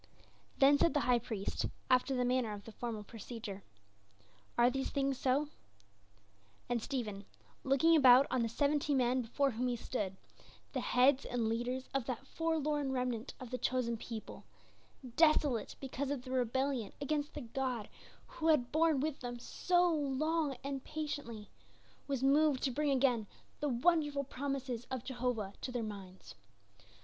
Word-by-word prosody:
Then 285 +1 +6
said 335 - +3
the 290 - +3
High 250 -2 +3
Priest, 220 -4 -3 0.2
after 255 +1 +3
the 250 -1 +1
manner 245 -3 +1
of 205 -1 -8
the 225 - -9
formal 220 -2 -5
procedure, 215 -2 -7 1.0
"Are 240 +1 +5
these 270 +1 -2
things 275 -2 0
so?" 275 +3 +1 1.2
And 240 -1 0
Stephen, 215 -7 -4 0.4
looking 275 +5 +4
about 265 -2 +8
on 255 - +2
the 230 - 0
seventy 290 +3 +1
men 255 0 +2
before 270 +4 0
whom 245 +2 -1
he 245 - 0
stood, 205 -5 -3 0.6
the 265 - 0
heads 255 +3 +4
and 240 -2 -1
leaders 245 +3 -2
of 275 -3 0
that 260 +1 -4
forlorn 300 -2 -1
remnant 250 -2 -2
of 255 -3 -8
the 255 - -2
chosen 250 -2 0
people, 225 -1 -7 0.7
desolate 300 -8 +3
because 270 +1 -3
of 280 -3 -2
their 255 0 -6
rebellion 255 -2 0
against 290 +1 -2
the - - -4
God 245 -2 -3 0.4
who 325 - -4
had 290 -6 +3
borne 315 -3 +3
with 300 -1 -2
them 245 -1 -5
so 355 +8 +2
long 295 0 0
and 275 -1 -4
patiently, 285 -9 -5 0.6
was 270 -2 -1
moved 285 0 +4
to 270 - +1
bring 295 +3 0
again 250 -5 +2 0.3
the 295 - 0
wonderful 290 +2 +2
promises 265 -3 -4
of 260 -3 -3
Jehovah 240 -6 -2
to 255 - -4
their 245 -2 -2
minds. 195 -3 -8
260 Hz, 155 wpm, -34 LUFS, 240-285 Hz, 1.2 s, about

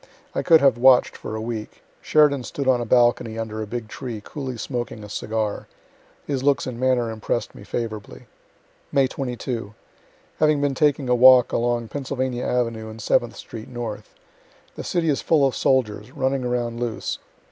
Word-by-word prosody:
I - - 0
could 165 -2 +6
have 135 -4 +4
watch'd 130 0 +5
for 110 - -6
a 110 - -4
week. 110 -1 -6 0.2
Sheridan 150 -3 +4
stood 140 +2 -4
on 125 -2 +4
a - - -2
balcony, 120 -1 +2
under 110 -1 -4
a 110 - -4
big 115 0 -5
tree, 120 -1 -6
coolly 135 -4 -5
smoking 120 -3 -4
a 105 - -9
cigar. 110 0 -3 0.6
His 140 -3 -2
looks 140 0 +2
and 125 -2 -5
manner 125 -3 +1
impress'd 110 +1 -3
me - - -12
favorably. 105 - -5 0.7
May 135 -1 +4
22. 120 -5 -4 0.6
Have 155 - +4
been 145 -1 +1
taking 145 -1 +1
a 125 - +3
walk 125 0 +7
along 120 -1 0
Pennsylvania 130 -2 -3
avenue 115 -3 -1
and 110 +1 -10
Seventh 115 +2 +1
street 110 -1 -9
north. 120 -4 -6 0.6
The - - -6
city 170 -2 -1
is 140 - +1
full 155 -4 +3
of 135 - 0
soldiers, 125 -4 +1
running 135 -1 -1
around 120 -1 -2
loose. 120 -2 -3
120 Hz, 170 wpm, -23 LUFS, 115-130 Hz, 0.7 s, walk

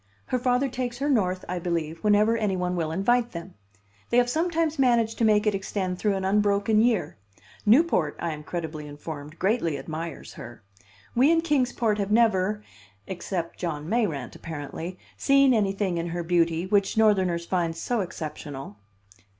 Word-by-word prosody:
Her 255 - -1
father 250 +2 +2
takes 245 -2 -4
her 285 +3 0
North, 185 -7 +1
I 180 0 -3
believe, 165 -2 -3
whenever 210 +2 +4
any 210 -4 0
one 180 0 -1
will 160 -3 -1
invite 240 +7 +1
them. 170 +2 -7 0.6
They 235 - +2
have 245 0 +3
sometimes 325 -1 0
managed 235 -4 +2
to 230 - +3
make 210 0 +4
it 210 - +2
extend 190 -2 -3
through 205 -2 +1
an 190 0 -2
unbroken 205 +2 +3
year. 230 -3 +1 0.5
Newport, 220 - +4
I 170 - -2
am 150 -1 -6
credibly 155 -2 -5
informed, 145 +1 -8
greatly 185 -6 0
admires 160 +1 -6
her. 120 -2 -11 0.5
We 260 +5 +4
in 330 0 +3
Kings 290 -7 +1
Port 215 -3 0
have 200 -1 -1
never 210 -2 +2 0.4
(except 175 -2 -4
John 155 -4 -3
Mayrant, 175 - -1
apparently) 165 +3 -6 0.2
seen 275 -1 +4
anything 195 -4 0
in 170 - -3
her 175 0 -3
beauty, 170 0 +1
which 200 +2 +1
Northerners 190 -6 +3
find 170 -2 -1
so 235 +6 -1
exceptional." 150 - -7
195 Hz, 165 wpm, -26 LUFS, 170-230 Hz, 0.6 s, whenever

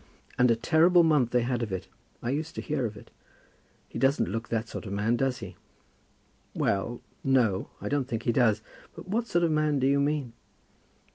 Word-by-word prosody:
"And 125 0 +4
a 115 - +4
terrible 165 +9 +4
month 150 -7 +3
they 120 0 +2
had 120 0 -1
of 110 -4 -3
it. 95 -2 -4 0.4
I 120 - -1
used 150 +3 -3
to - - -3
hear 145 -5 -1
of 105 -1 -9
it. - - -14 0.8
He - - -7
doesn't 135 - +2
look 115 +2 -4
that 115 0 -1
sort 110 - -7
of 95 - -5
man, 105 +4 +1
does 130 -1 -1
he?" - - -11 1.0
"Well; 115 +5 -1 0.2
no. 120 -8 +2
I - - -5
don't 140 -2 0
think 115 -5 -3
he 120 - +2
does. 115 -3 +2 0.3
But - - -10
what 225 +5 -1
sort 175 -4 +1
of 165 - +2
man 155 -1 +2
do 130 - +1
you 140 +1 +3
mean?" 140 -4 -1
125 Hz, 205 wpm, -28 LUFS, 115-150 Hz, 1.0 s, And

